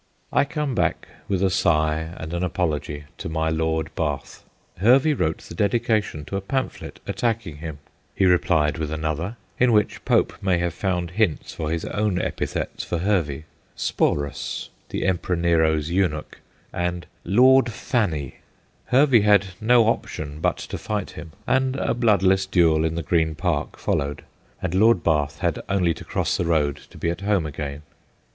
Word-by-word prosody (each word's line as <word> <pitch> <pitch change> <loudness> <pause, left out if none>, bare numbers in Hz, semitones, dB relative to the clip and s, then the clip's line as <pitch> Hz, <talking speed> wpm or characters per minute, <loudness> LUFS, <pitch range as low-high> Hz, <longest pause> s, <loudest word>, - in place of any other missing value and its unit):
I - - +4
come 150 -2 -2
back - - 0 0.2
with 95 -1 0
a 95 - +3
sigh 80 -2 +1
and 80 +1 -6
an 85 - -1
apology 75 -5 -2 0.2
to - - -4
my 80 0 0
Lord 80 0 -1
Bath. 75 -4 -3 0.4
Hervey 130 - +5
wrote 80 - 0
the - - -10
dedi 100 +7 +2
cation 105 -10 -1
to 100 - -5
a - - -3
pamphlet 130 +7 -4
attacking 110 -10 -2
him; 80 -2 -6 0.4
he 95 - +3
replied 85 -4 +3
with 75 -2 -2
another, 80 +7 -3 0.2
in 125 -1 +4
which 105 -2 +1
Pope - - +2
may 95 -2 +2
have 85 -1 -1
found 90 -2 -2
hints 100 -4 0
for 80 -2 -3
his 85 0 -2
own 105 -3 0
epithets - - -3
for 85 - -2
Hervey 85 -6 0 0.2
' - - -37
Sporus,' 70 -1 -1 0.2
the - - -2
Emperor 95 -1 0
Nero's 80 -2 +2
eunuch, 85 -5 -1 0.3
and 90 0 -2
' - - -38
Lord 130 -1 +6
Fanny 85 - -1 0.2
'; - - -38
Hervey 135 -4 +6
had 100 -2 +4
no 120 +2 +5
option 75 -9 -2
but 90 +1 +1
to - - -6
fight 105 -3 -3
him, 80 - -9
and 130 0 +1
a - - 0
bloodless 95 -5 +3
duel 80 -4 +3
in 80 0 -1
the 85 - -2
Green 80 0 +1
Park 80 -2 -2
followed, 70 +1 -2 0.4
and 90 -2 -1
Lord 110 +5 +4
Bath 75 -2 0
had - - 0
only 90 -4 +2
to - - -10
cross - - -1
the 90 - -1
road 75 -4 +1
to - - -14
be 85 - 0
at 85 - -6
home 100 -4 +1
again. 75 0 -5
85 Hz, 175 wpm, -23 LUFS, 80-105 Hz, 0.4 s, Lord